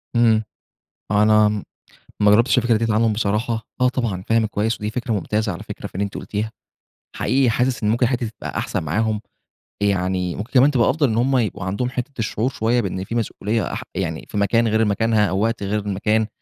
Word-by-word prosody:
إمم، 115 -2 +4 0.7
أنا 105 +1 +5 0.7
ما 105 0 +6
جرّبتش 115 +5 +4
الفكرة 120 -2 +3
ديّة 115 0 0
عنهم 110 0 +3
بصراحة، 110 +2 -1
آه، 125 - +5
طبعًا 115 -8 -2
فاهمِك 115 -1 +2
كويّس 110 +2 0
ودي 105 - -2
فكرة 120 +2 -3
ممتازة 105 +1 -1
على 85 - -7
فكرة - - -7
في - - -20
اللي 100 - 0
أنتِ 100 - -5
قلتيها. 110 +1 -3 0.6
حقيقي 135 -2 +2
حاسس 125 +1 0
إن 105 - +2
ممكن 120 +3 +2
الحتّة 120 0 0
دي 110 - -5
تبقى - - -5
أحسن - - -2
معاهم، 105 +7 0 0.6
يعني 90 -3 0
ممكن 110 +4 -6
كمان 135 +2 +6
تبقى 125 -5 +3
أفضل 145 +1 +2
إن 110 - -1
هُم 130 +3 +2
يبقوا 105 -6 -2
عندهم 100 +7 -2
حتّة 125 +2 -4
الشعور 110 +2 -1
شويّة 120 0 +1
بإن 95 -3 -3
في 115 - -6
مسؤوليّة 110 -1 -1
أح - - -4
يعني 85 -4 -3
في - - -7
مكان 115 +3 +2
غير 110 +1 +2
مكانها 110 +1 +2
أو 95 - -1
وقت 115 -1 0
غير 100 +2 0
المكان، 105 +2 0
110 Hz, 200 wpm, -21 LUFS, 105-120 Hz, 0.7 s, ما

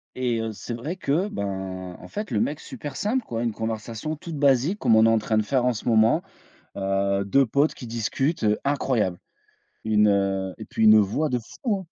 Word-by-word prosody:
et 125 -2 0
heu, 115 0 -3
c'est 105 +5 -7
vrai 140 +10 -4
qu'en 95 - -3
fait, 210 -8 -5
le 105 - +1
mec 150 +6 -1
super 145 - -8
simple 240 +5 0
quoi! 115 0 -3
Une 115 - 0
conversation 110 +6 -4
toute 165 0 -7
basique 140 - +2
comme 110 - +4
on 110 - +6
est - - +5
en 115 0 +3
train 110 +1 0
de 110 - +3
faire 125 +3 +1
en 125 - +3
ce 115 - -7
moment, 115 +8 +4 0.5
heu, 100 0 0
2 135 +7 +4
potes 140 +6 +2
qui 125 - -9
discutent, 120 - -1
heu, 105 0 +2
incroyable. 125 -10 0 0.7
Une, 105 -1 +4
heu 95 -2 0
et 110 - -7
puis 110 - -1
une 110 0 +8
voix 110 +10 0
de 125 - +1
fou, 205 - -3
hein! 190 - -11
115 Hz, 205 wpm, -24 LUFS, 105-140 Hz, 0.7 s, une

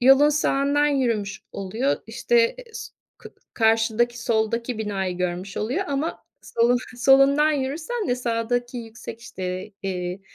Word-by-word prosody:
yolun 270 +4 +7
sağından 290 0 +2
yürümüş 230 -8 0
oluyor. 220 +9 -1
İşte, 475 0 +2
eee, - - -9
s - - -7 0.3
kı - - -13 0.2
karşıdaki 225 +1 +2
soldaki 230 +1 0
binayı 195 -4 -2
görmüş 180 +2 -3
oluyor 260 - -1
ama 285 +4 -2 0.2
solu 235 +1 +2 0.2
solundan 275 +4 +5
yürürsen 310 - -2
de 245 - +1
sağdaki 245 +1 -1
yüksek, 225 0 -9
işte, 190 -3 -5
eee, 180 -1 -3
240 Hz, 130 wpm, -24 LUFS, 215-275 Hz, 0.3 s, yolun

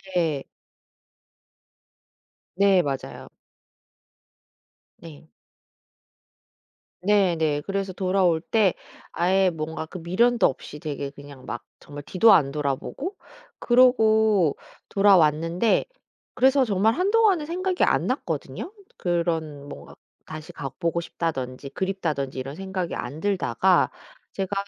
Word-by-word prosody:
네. 155 -6 0 2.1
네 195 -1 +4
맞아요. 135 -3 -5 1.7
네. 155 -1 -14 1.7
네네. 170 -7 +2
그래서 195 -1 -3
돌아올 185 -3 +1
때 205 0 +2 0.4
아예 185 +2 +2
뭔가 160 -1 -5
그 185 - -9
미련도 230 +8 +2
없이 150 +2 -3
되게 145 -3 -4
그냥 140 -2 -13
막 120 - -6 0.2
정말 145 0 -10
뒤도 205 +8 +4
안 140 -3 +4
돌아보고 150 - -3 0.4
그러고 220 - +4 0.3
돌아왔는데 175 0 +3 0.5
그래서 265 +2 +4
정말 220 -1 +2
한동안은 390 - +2
생각이 365 +2 -1
안 - - +2
났거든요. 380 - -4 0.3
그런 165 -5 -2
뭔가 - - -11 0.3
'다시 155 0 -9
가보고 170 +5 -3
싶다.'든지 140 -6 -4
'그립다.'든지 160 -9 -3
이런 135 +3 -5
생각이 190 -2 -4
안 140 +5 -5
들다가 185 - +2 0.4
제가 195 0 -3
175 Hz, 225 characters per minute, -24 LUFS, 150-205 Hz, 2.1 s, 네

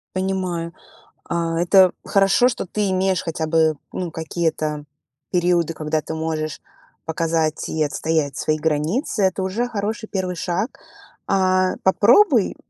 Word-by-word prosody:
Понимаю, 185 -3 -2 0.6
а, 165 -1 -1
это 185 +1 +5
хорошо, 195 +5 +4
что 250 - -2
ты 205 +2 -1
имеешь 190 -1 +1
хотя 160 -1 -3
бы 160 -1 +3 0.2
ну 180 -2 -4
какие-то 160 -2 -2 0.5
периоды, 175 -2 +2
когда 155 0 -2
ты 160 - -6
можешь 160 -1 -3 0.4
показать 160 -1 -1
и 155 - 0
отстоять 150 -1 -1
свои 155 - 0
границы, 160 - -1
это 190 0 +1
уже 210 +6 -1
хороший 220 0 -3
1 185 -3 -3
шаг. 180 +7 -3 0.5
А, 185 -1 +2
попробуй, 235 - +4
175 Hz, 130 wpm, -21 LUFS, 160-190 Hz, 0.6 s, это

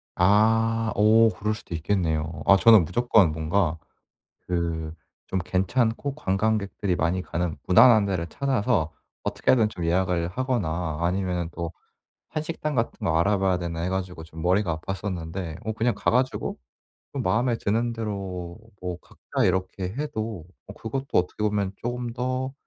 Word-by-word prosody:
아 110 +4 +3
어 110 +2 +6
그럴 105 0 -2
수도 105 - -10
있겠네요. 80 -2 -1
아 100 - +7
저는 110 -2 +7
무조건 100 -1 +3
뭔가 80 +2 0 0.7
그 85 -3 -2 0.4
좀 95 - 0
괜찮고 115 +8 0
관광객들이 100 -5 0
많이 85 +3 0
가는 85 -2 -2
무난한 110 +2 +7
데를 90 -4 -2
찾아서 110 - 0 0.3
어떻게 - - 0
하든 115 -4 +4
좀 90 -5 -6
예약을 90 0 +1
하거나 90 - -2
아니면은 90 -1 -1
또 85 +1 -4 0.6
한식당 155 -1 -3
같은 115 -2 -2
거 80 -1 +2
알아봐야 95 0 +2
되나 85 -2 -4
해 90 - -1
가지고 90 -3 -3
좀 80 0 -10
머리가 90 -1 +1
아팠었는데 90 -2 -4
어 110 - 0
그냥 115 +1 0
가 - - 0
가지고 130 +2 0 0.6
좀 - - -3
마음에 120 +1 +1
드는 115 +3 0
대로 95 -6 -5 0.2
뭐 90 -1 -4
각자 - - -4
이렇게 95 +1 0
해도 110 - -4 0.2
어 100 - -8
그것도 130 +6 -4
어떻게 90 +4 0
보면 100 -2 0
쪼금 120 +1 -4
더 130 +2 -2
95 Hz, 310 characters per minute, -25 LUFS, 85-115 Hz, 0.7 s, 아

